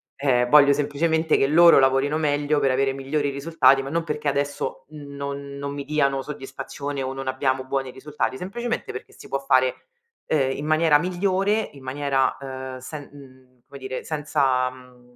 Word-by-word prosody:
Ehm, 125 -3 +1
voglio 145 0 +7
semplicemente 160 +3 +1
che - - +3
loro 170 +3 +7
lavorino 135 +3 +2
meglio, 145 -1 +1
per 135 -2 +2
avere 135 +1 +1
migliori 140 +2 -2
risultati, 140 -2 +3
ma 135 - -6
non 165 +3 -1
perché 150 -2 -4
adesso 140 0 -2
non 140 -1 -7
non 140 0 -5
mi 140 -1 -5
diano 140 -2 +1
soddisfazione 140 0 -6
o 130 0 -3
non 135 0 -6
abbiamo 130 0 0
buoni 135 -1 -2
risultati, 135 0 -3
semplicemente 235 - -4
perché 125 - -9
si - - -13
può 135 - -1
fare, 130 -2 +2 0.5
ehm, 135 -4 +1
in 145 - -5
maniera 155 -1 +4
migliore, 195 +4 0
in 140 -2 -14
maniera, 135 0 0
ehm, 130 -1 -7
sen 145 +3 -8
mhmm, 130 -3 -17
come 140 - -12
dire, 130 -1 -5
senza, 135 -4 0
mhmm, 125 -1 -17
140 Hz, 170 wpm, -23 LUFS, 130-150 Hz, 0.5 s, voglio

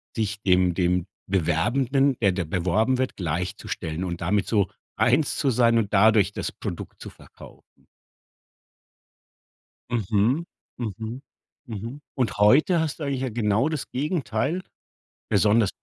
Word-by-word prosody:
sich 105 -2 -2
dem 90 -2 +3
dem 90 0 +1 0.2
Bewerbenden, 120 - +1
der 100 -4 +3
da 90 0 -1
beworben 95 +10 +1
wird, 130 0 -1
gleichzustellen 85 -1 -3
und 85 -2 -4
damit 100 +4 +1
so 100 -4 +2 0.3
eins 135 +5 +2
zu 140 - +1
sein 115 -1 +3
und 110 -3 -1
dadurch 105 -1 +5
das - - -3
Produkt - - -7
zu - - -7
verkaufen. - - -17 2.0
Mhm. 115 - +1 0.3
Mhm. 115 +2 -5 0.4
Mhm. 115 +4 -6
Und 125 -4 -1
heute 145 - +5
hast 160 -2 -2
du 155 - -4
eigentlich 135 -2 -2
ja 130 - -2
genau 110 +3 +1
das 155 -4 -4
Gegenteil. 145 - -1 0.7
Besonders 105 +1 +3
110 Hz, 130 wpm, -25 LUFS, 95-130 Hz, 2.0 s, dadurch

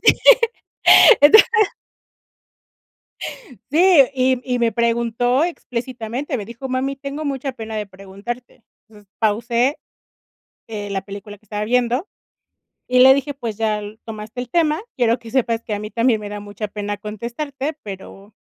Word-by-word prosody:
Sí, - - +7 1.1
entonces. 310 +10 +8 2.2
Sí, 325 -3 +6
y 255 -1 +2
y 250 -1 -1
me 235 -1 +1
preguntó 235 +3 +1
explícitamente. 255 -3 -4
Me 205 - -6
dijo: 245 +4 -8
"Mami 265 +2 -1
tengo 280 +3 -6
mucha 270 -1 -3
pena 220 -3 -7
de 210 -1 -3
preguntarte". 200 +6 -9 0.2
Entonces 210 -3 -19
pausé, 235 +5 +1 0.9
eh, 210 -2 -6
la 195 -1 -2
película 205 +1 -9
que 215 - -31
estaba 210 -1 -4
viendo 250 - +1 0.8
y 250 - +1
le 265 +1 +9
dije: 280 +1 -2
"Pues 235 -6 -5
ya 215 -1 0 0.2
tomaste 220 +2 -7
el 245 - -8
tema, 320 +2 +1
quiero 240 -1 +2
que 230 - -11
sepas 230 -2 0
que 215 - -4
a - - -5
mí 210 +1 -7
también 230 +1 +2
me 205 -1 -7
da 205 0 -6
mucha 205 +1 -6
pena 205 0 -4
contestarte, 240 +8 -5
pero 195 +1 -10
235 Hz, 145 wpm, -20 LUFS, 210-265 Hz, 2.2 s, le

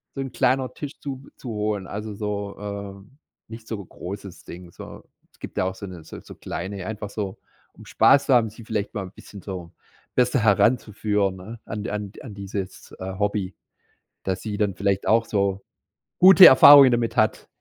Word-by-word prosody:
so 135 - -3
'n 135 -2 -5
kleiner 130 +1 0
Tisch 145 -2 -8
zu 135 -1 -8
zu 125 - -9
holen, 105 -3 -2
also 105 +1 -6
so, 100 -1 -4
ähm, 100 +4 -8 0.3
nicht 115 0 -11
so 110 -3 -5
'n 90 - -14
großes 100 0 -9
Ding, 90 0 -11
so. - - -11 0.3
Es - - -29
gibt - - -9
da - - +1
auch 95 - -3
so 100 - -8
'ne 90 -4 -10
so - - -10
so - - -12
kleine, 95 +2 -6
einfach 105 -2 -6
so, 100 -3 -5 0.4
um - - -15
Spaß 140 0 +4
zu 135 - +4
haben, 115 -3 +3
sich 110 - -18
'n 110 - -13
vielleicht 105 -3 -3
mal 100 - -3
'n 90 - -10
bisschen 105 -1 -13
so 90 -4 -7 0.4
besser 125 +1 +2
heranzuführen, 105 -2 +1
ne? 110 +5 -10
An 105 0 -5
an 105 -1 -4
an 110 - -9
dieses, 100 -1 -7
äh, 95 +1 -5
Hobby 100 -2 -2 0.7
dass 95 -1 -2
sie 105 -2 -4
dann 100 -3 0
vielleicht 100 0 -1
auch 115 0 +3
so 100 -1 -1 0.6
gute 185 0 +9
Erfahrungen 140 0 +9
damit 120 -1 0
hat. 110 0 +1
105 Hz, 195 wpm, -23 LUFS, 100-115 Hz, 0.7 s, gute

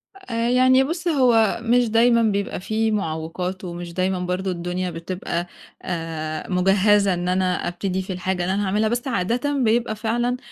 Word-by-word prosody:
آآ، 235 -11 -2
يعني 255 +1 +5
بُصّ 330 +5 -3
هو 245 -10 +3
مش 240 0 +2
دايمًا 235 +1 +4
بيبقى 200 -4 0
في 220 +4 -1
معوّقات 180 0 -3
ومش 175 -1 -6
دايمًا 185 0 0
برضو 180 +1 -2
الدنيا 180 +1 -3
بتبقى، 170 +1 -4 0.3
آآ 160 -2 -4
مُجهَّزة 195 +2 +3
إن 175 0 -3
أنا 185 0 0
أبتدي 185 +1 -2
في 190 0 -5
الحاجة 180 0 -2
اللي 185 - 0
أنا 205 +1 0
هاعملها، 210 +3 +1
بس 240 +3 -2
عادةً 240 +6 0
بيبقى 225 -1 +1
فعلًا، 240 +3 -1
195 Hz, 160 wpm, -22 LUFS, 180-230 Hz, 0.3 s, يعني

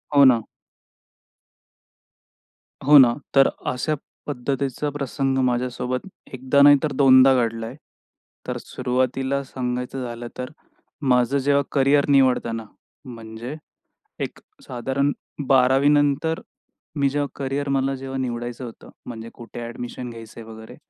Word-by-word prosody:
हो 140 - +8
ना. 125 -3 +5 2.5
हो 150 0 +9
ना, 125 -4 +7 0.2
तर 135 0 +7 0.2
अशा 130 +4 -1 0.3
पद्धतीचा 140 +1 -2
प्रसंग 135 -1 -2
माझ्यासोबत 125 +3 -2 0.3
1दा 130 0 -9
दा 140 +1 +5
नाही, 145 0 +8
तर 155 - 0
2दा 130 -1 +8
दा 135 0 +6
घडलाय. 115 +1 -5 0.7
तर - - -3
सुरुवातीला 130 +2 -1
सांगायचं 125 0 -4
झालं 120 0 -6
तर 125 +2 -5 0.6
माझं 125 +2 +3
जेव्हा 140 +1 +2
करिअर 140 +1 +3
निवडताना 125 -4 +2 0.4
म्हणजे 115 +1 -8 0.7
एक - - -11 0.3
साधारण 135 +3 -1 0.4
12वी 135 +1 +4
नंतर 145 +2 +2 0.5
मी 140 -2 +2
जेव्हा 145 +1 -1
करिअर 140 +1 -2
मला 135 0 0
जेव्हा 135 0 -6
निवडायचं 120 0 -4
होतं 115 - -11 0.2
म्हणजे 115 -1 -8
कुठे 120 0 -10
ॲडमिशन 120 +1 -6
घ्यायचंय 115 0 -10
वगैरे. 110 0 -11
130 Hz, 120 wpm, -23 LUFS, 120-140 Hz, 2.5 s, हो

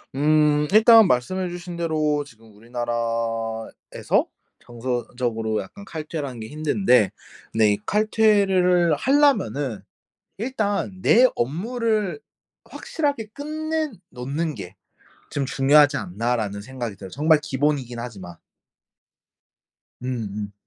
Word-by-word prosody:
음. 150 0 +3
일단 225 -1 +8
말씀해 180 +10 0
주신 175 0 -7
대로 155 -3 0
지금 115 -4 -18
우리나라에서 115 -1 -2 0.3
정서적으로 120 -2 -3
약간 200 - -11
칼퇴를 155 -4 -5
하는 125 -3 -8
게 110 - -6
힘든데 150 - +2 0.4
근데 110 -2 +3
이 - - -2
칼퇴를 195 -5 +3
하려면은 145 - +2 0.6
일단 205 -5 -2
'내 250 +6 +6
업무를 215 - -1 0.5
확실하게 285 -8 -3
끝내 310 +1 -3 0.2
놓는 145 +5 -3
게 95 -2 -9 0.5
좀 140 - -2
중요하지 145 +1 +4
않나.'라는 105 +1 -2
생각이 120 -2 -6
들어요, 95 -1 -10
정말 155 - +3
기본이긴 135 -4 -1
하지만. 95 -8 -8 1.6
음 125 - -9 0.3
음. 105 -1 -5
145 Hz, 245 characters per minute, -23 LUFS, 115-190 Hz, 1.6 s, 일단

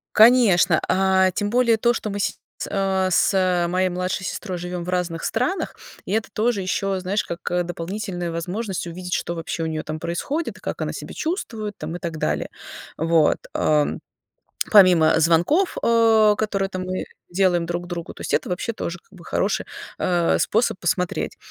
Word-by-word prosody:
Конечно, 215 -8 +6
а, 190 0 +3
тем 205 +2 -2
более 235 -1 +3
то, 235 +2 +3
что 215 -3 -4
мы 205 - -4
сейчас, 205 - -1 0.3
э, 190 -1 +1
с 180 -1 +3
моей 185 +1 +1
младшей 180 +1 -2
сестрой 190 -1 -4
живем 175 0 -4
в 180 - -6
разных 180 -2 -2
странах, 255 +12 -1 0.3
и - - -6
это 220 0 0
тоже 220 -2 0
еще, 190 +1 -1
знаешь, 190 +3 -1
как, 170 - -5
э, 180 0 +1
дополнительная 175 +1 -4
возможность 185 +4 -3
увидеть, 180 +1 -6
что 170 - -2
вообще 165 0 -4
у - - -1
нее 155 -1 -2
там 155 0 -5
происходит, 275 - -3
и - - -24
как - - -4
она - - -2
себя - - -8
чувствует 225 - -3
там, 160 +3 -5
и - - -5
так 165 -3 -4
далее. 75 - -1 0.5
Вот. 165 -1 +3 0.2
А, 150 -1 +3 0.8
помимо 180 -6 +6
звонков, 170 - +3
а, 225 -2 +5
которые 200 -2 -1
там 185 -1 -4
мы 185 0 -3 0.2
делаем 175 -2 +2
друг 175 +1 -4
другу, 170 -2 -6
то - - -12
есть - - -4
это - - +1
вообще 180 +6 -2
тоже, 175 -4 -5
как - - -36
бы, 180 -4 -15
хороший, 200 - 0 0.3
а, 175 -2 +2
способ 220 -3 +1
посмотреть, 180 -4 -1
185 Hz, 180 wpm, -23 LUFS, 170-210 Hz, 0.8 s, Конечно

